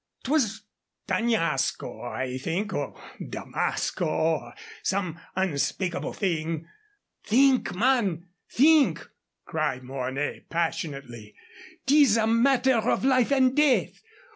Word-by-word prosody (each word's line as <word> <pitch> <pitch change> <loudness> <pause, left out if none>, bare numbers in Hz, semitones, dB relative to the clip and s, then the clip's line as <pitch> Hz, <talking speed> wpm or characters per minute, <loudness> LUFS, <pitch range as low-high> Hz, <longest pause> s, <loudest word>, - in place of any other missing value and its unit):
'Twas 225 -7 0 0.4
D'Añasco, 165 - -1
I 130 +1 -4
think, 175 +9 -2
or - - -4 0.2
Damasco, 175 - -2
or 160 0 -1 0.3
some 190 -3 -1
such 165 - -20 0.2
unspeakable 170 +4 -2
thing." 165 -4 -2 0.6
"Think, 260 -1 +3
man 205 -7 +1 0.2
think!" 300 +2 +4 0.4
cried 150 -5 -2
Mornay, 130 +2 -4
passionately. 140 -9 -4 0.5
"'Tis 275 -5 +5
a 220 - +2
matter 250 +2 +3
of 230 +3 0
life 255 -1 +3
and 260 -2 +3
death. 295 -3 +2
190 Hz, 100 wpm, -26 LUFS, 155-255 Hz, 0.6 s, Tis